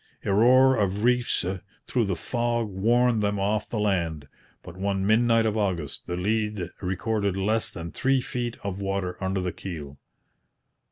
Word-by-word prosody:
A 100 - +1
roar 130 +5 +6
of 100 0 0
reefs 125 -6 +2 0.4
through 120 -3 +1
the 95 -2 -1
fog 120 +3 -1
warned 115 +4 +2
them 100 -1 0
off 105 +2 0
the 115 - -3
land; 85 -8 -1 0.4
but - - -10
one 95 0 -1
midnight 115 +1 +4
of 110 -1 0
August 90 -9 -2
the 90 - -3
lead 105 -2 -1
recorded 100 +1 -1
less 110 +3 +1
than 85 0 -7
three 135 0 +2
feet 120 -1 -4
of 100 -1 -4
water 95 -2 -2
under 95 0 0
the 90 -1 -2
keel. 75 -7 -7
100 Hz, 160 wpm, -26 LUFS, 95-115 Hz, 0.4 s, roar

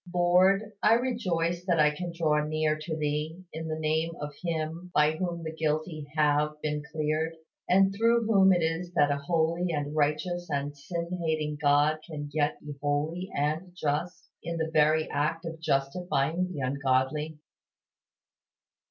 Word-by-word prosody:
Lord, 185 +4 +3
I 215 - +5
rejoice 180 -9 -1
that 170 -3 +2
I 150 0 +5
can 175 +3 -5
draw 155 -3 +1
near 155 0 0
to 155 +1 -5
Thee 150 +2 -2
in 160 +1 -5
the 155 0 -3
name 160 +1 0
of 145 0 -5
Him 165 +1 -3
by 150 +1 +5
whom 170 0 -3
the 160 0 -4
guilty 155 -1 -2
have 150 0 +2
been 150 -1 -1
cleared; 155 +1 -1 0.3
and 195 +1 +5
through 230 +2 +3
whom 195 -3 +5
it 175 -2 +3
is 165 +2 -1
that 145 -4 +3
a 140 - +1
holy 165 +4 0
and 145 -1 -3
righteous 155 +4 0
and 145 0 -2
sin 170 +5 -4
hating 155 -2 -1
God 145 +1 +3
can 145 -3 -7
yet 150 -1 0
be 150 0 -7
holy 150 +6 -1
and 155 +5 -1
just, 155 +4 -2
in 170 0 -4
the 160 0 -2
very 155 0 +4
act 155 +4 -1
of 165 -1 -6
justifying 160 +3 0
the 145 - -5
ungodly. 135 +3 0
155 Hz, 160 wpm, -28 LUFS, 150-175 Hz, 0.3 s, I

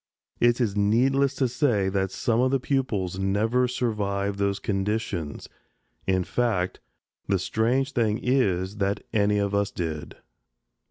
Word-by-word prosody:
It 120 +1 +3
is 110 -5 0
needless 130 +7 +2
to 130 - +1
say 120 -6 +1
that 95 0 0
some 115 +4 0
of 130 - +3
the 135 0 +1
pupils 110 -10 -1
never 110 +6 +1
survived 100 -5 -1
those 100 0 +1
conditions; 95 -6 -2 0.6
in 95 -1 +2
fact, 100 -5 -1 0.5
the 100 - +2
strange 120 +8 0
thing 110 -4 +1
is 100 -7 0
that 100 0 -1
any 105 -1 +2
of 100 0 0
us 100 0 +1
did. 80 -6 -5
105 Hz, 140 wpm, -26 LUFS, 95-120 Hz, 0.6 s, It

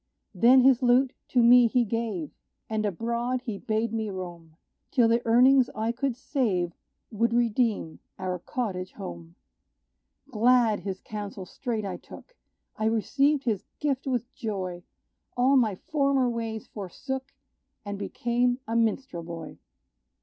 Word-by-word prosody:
Then 240 +7 +6
his 260 -1 +5
lute 250 +1 +4
to 245 -2 +3
me 245 0 +7
he 240 +1 +2
gave; 215 -7 -3 0.4
And 215 -1 -1
abroad 235 +6 -2
he 220 -5 -5
bade 220 +1 -1
me 220 -1 -2
roam, 175 -4 -8 0.3
Till 245 -5 +4
the 230 +1 +3
earnings 250 +2 +5
I 220 +1 0
could 255 +1 -2
save 210 - -1 0.4
Would 230 +2 +1
redeem 230 -7 +1 0.2
our 185 -1 -3
cottage 185 -4 -4
home. 85 -1 -9 1.0
Glad, 230 -1 +4
his 190 0 -5
counsel 205 -3 -6
straight 225 +1 -4
I 195 - -4
took - - -14 0.4
I 215 - -1
received 275 +6 +2
his 220 -6 -1 0.2
gift 280 -3 -1
with 245 -1 -1
joy; 190 -7 -4 0.6
All 260 +3 +4
my 225 -7 +3
former 275 +2 +1
ways 225 -2 -3
forsook, 260 +7 -6 0.5
And 205 -1 -5
became 240 +4 0
a 230 - -2
minstrel 230 -4 0
boy. 165 -1 -8
230 Hz, 135 wpm, -27 LUFS, 200-250 Hz, 1.0 s, me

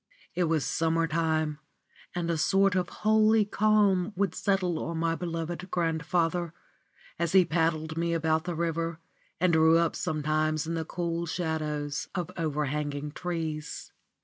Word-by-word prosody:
It 180 - +1
was 160 -3 +1
summer 165 0 +1
time, 155 -2 0 0.6
and 170 -1 -1
a - - +1
sort 195 +4 +3
of 180 -1 0
holy 215 0 +3
calm 205 -2 +2
would 195 -2 0
settle 185 -4 0
on 165 0 -3
my 165 0 +1
beloved 170 +1 -4
grandfather, 165 0 0 0.6
as 170 0 0
he 190 -2 +7
paddled 160 -1 0
me 170 0 0
about 160 0 +1
the 175 -1 -3
river 165 0 -2 0.4
and 180 0 +3
drew 160 0 +6
up 170 -1 +1
sometimes 155 0 0
in 165 - -3
the 165 -1 -2
cool 170 0 -3
shadows 155 -3 -2
of 180 -3 -3
overhanging 150 -1 -2
trees. 160 -3 -4
165 Hz, 145 wpm, -28 LUFS, 155-175 Hz, 0.6 s, he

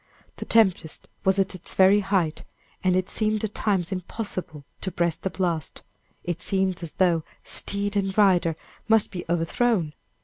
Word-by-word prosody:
The - - -6
tempest 190 -8 +2 0.2
was 190 0 +3
at 195 0 +2
its 185 -1 -5
very 190 +2 +6
height, 190 -6 0 0.4
and 185 -1 +3
it 185 0 +1
seemed 215 -1 -1
at 215 -1 -2
times 195 -4 0
impossible 185 -5 -5 0.2
to 190 - -2
breast 170 -3 -1
the 190 - -1
blast 170 -5 -3 0.4
it 175 0 -3
seemed 190 -1 0
as 170 -3 -6
though 175 -4 +2 0.2
steed 200 0 -1
and 195 -1 -1
rider 180 -5 +4 0.3
must 220 -1 +3
be 180 -3 -6
overthrown! 175 0 +1
190 Hz, 160 wpm, -25 LUFS, 175-200 Hz, 0.4 s, very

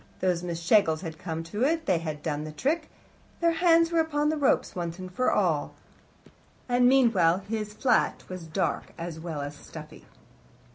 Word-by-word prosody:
Those 180 -2 +1
Miss 170 -2 -4
Schlegels 170 -3 +3
had 160 -3 -7
come 165 -2 -4
to 205 +8 -3
it; 320 +4 +1
they 185 -4 +2
had 155 -2 -5
done 150 -2 -2
the 155 - -6
trick; 300 - -1 0.5
their 335 0 +3
hands 330 0 +4
were 335 - +2
upon 300 -2 +1
the 310 - +1
ropes, 285 -3 +1
once 170 -1 -4
and 185 -1 -8
for 255 - +1
all. 170 -8 0 0.9
And 245 0 +4
meanwhile, 200 -9 +4
his 210 -1 -4
flat 245 -2 +1
was 185 -3 -7
dark, 160 +4 -2
as 165 -1 -6
well 160 -3 -5
as 145 +1 -5
stuffy. - - -12
185 Hz, 180 wpm, -27 LUFS, 165-265 Hz, 0.9 s, hands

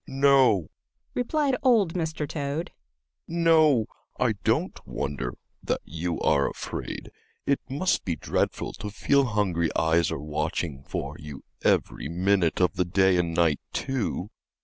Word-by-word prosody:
"No," 135 - +4 0.4
replied 275 +2 +1
old 225 - +4
Mr. 160 -4 -2
Toad. 145 +3 -3 0.6
"No, 160 -7 +4 0.3
I - - +3
don't - - +1
wonder 65 -4 -3 0.3
that - - -1
you 85 +2 -3
are 70 -1 +3
afraid. - - -6 0.3
It 140 - +2
must 150 +8 +1
be 85 - -1
dreadful - - -1
to 105 - -4
feel 140 +6 +2
hungry 95 -7 +1
eyes 80 +1 +2
are - - -2
watching 75 0 -3
for - - -4
you 75 -2 -9 0.2
every 75 - +1
minute 90 0 +2
of 90 -1 +2
the 90 - +2
day 95 +1 +3
and 85 -2 0
night, 80 -4 +3
too." 115 -6 -2
100 Hz, 135 wpm, -26 LUFS, -, 0.6 s, No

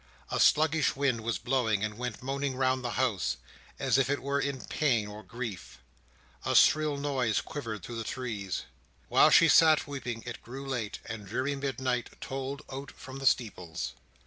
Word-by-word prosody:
A - - 0
sluggish 155 0 +4
wind 135 -4 +1
was 115 -3 -1
blowing, 115 -3 +1
and 105 0 -2
went 125 0 -5
moaning 135 0 -2
round 130 0 +1
the 120 - -2
house, 100 - +1 0.4
as - - +2
if 135 - +2
it 145 - -1
were 140 +1 0
in 140 -2 -2
pain 120 -9 +1
or 105 +1 -8
grief. 115 -4 -7 0.7
A - - 0
shrill 155 -2 +5
noise 135 -6 +1
quivered 115 - -5
through 120 +3 -6
the 115 - -3
trees. 110 -6 -4 0.5
While - - +6
she - - +7
sat 160 -2 +6
weeping, 125 -5 -5
it 120 -1 -6
grew 135 +3 -8
late, 120 -6 -3
and 110 -2 -6
dreary 130 +7 -1
midnight 130 -3 -2
tolled 135 +1 -5
out 135 +1 -6
from 130 +1 -10
the 135 - +1
steeples. 90 -10 0
130 Hz, 175 wpm, -30 LUFS, 110-140 Hz, 0.7 s, she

